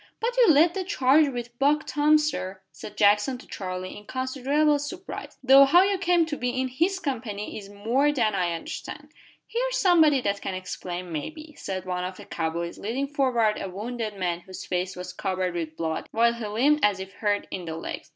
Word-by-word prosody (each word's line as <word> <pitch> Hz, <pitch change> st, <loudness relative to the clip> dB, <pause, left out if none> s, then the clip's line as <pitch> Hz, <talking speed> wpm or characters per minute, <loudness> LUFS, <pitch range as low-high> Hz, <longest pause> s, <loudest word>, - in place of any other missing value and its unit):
"But 475 Hz, +2 st, -1 dB
you -, -, +5 dB
led 325 Hz, +3 st, +5 dB
the 385 Hz, -, -2 dB
charge 300 Hz, -5 st, +4 dB
with 240 Hz, -2 st, -7 dB
Buck 290 Hz, +2 st, +3 dB
Tom, 300 Hz, +1 st, +4 dB
sir," 190 Hz, -11 st, -3 dB
said 210 Hz, 0 st, -10 dB
Jackson 210 Hz, +5 st, +3 dB
to 250 Hz, -, -14 dB
Charlie, 185 Hz, -1 st, -6 dB
in 210 Hz, -, -11 dB
considerable 275 Hz, +3 st, +1 dB
surprise, 355 Hz, +6 st, -7 dB
"though 270 Hz, +1 st, +8 dB
how 345 Hz, +7 st, +6 dB
you 395 Hz, -1 st, +1 dB
came 355 Hz, -3 st, +3 dB
to 300 Hz, -2 st, -4 dB
be 250 Hz, +1 st, -2 dB
in 260 Hz, 0 st, 0 dB
his 340 Hz, +10 st, 0 dB
company 230 Hz, -, -4 dB
is 200 Hz, -2 st, -8 dB
more 235 Hz, +8 st, +1 dB
than 230 Hz, -7 st, +1 dB
I 180 Hz, -3 st, +1 dB
can 170 Hz, -, -1 dB
understand." -, -, -8 dB, 0.3 s
"Here's -, -, -1 dB
somebody 320 Hz, -7 st, +5 dB
that 200 Hz, -3 st, -1 dB
can 190 Hz, -, -3 dB
explain, 180 Hz, -1 st, -6 dB
maybe," 310 Hz, -, -6 dB
said 185 Hz, -1 st, -5 dB
one 180 Hz, -1 st, -2 dB
of 185 Hz, +1 st, -5 dB
the -, -, -11 dB
cow 165 Hz, -1 st, -2 dB
boys, 170 Hz, +1 st, -5 dB
leading 260 Hz, +7 st, -2 dB
forward 250 Hz, -7 st, +1 dB
a 195 Hz, -, -4 dB
wounded 215 Hz, +2 st, -5 dB
man 175 Hz, -2 st, -1 dB
whose 185 Hz, +1 st, -9 dB
face 185 Hz, +1 st, -2 dB
was 180 Hz, 0 st, -7 dB
covered 185 Hz, -2 st, -2 dB
with 160 Hz, -2 st, -4 dB
blood, 160 Hz, -1 st, -3 dB
while 235 Hz, +1 st, +3 dB
he 235 Hz, -2 st, -5 dB
limped 275 Hz, +9 st, +2 dB
as 205 Hz, -2 st, +3 dB
if 190 Hz, +1 st, -8 dB
hurt 205 Hz, 0 st, -1 dB
in 180 Hz, -2 st, -5 dB
the 160 Hz, -1 st, -5 dB
legs. -, -, -6 dB
235 Hz, 210 wpm, -26 LUFS, 185-295 Hz, 0.3 s, though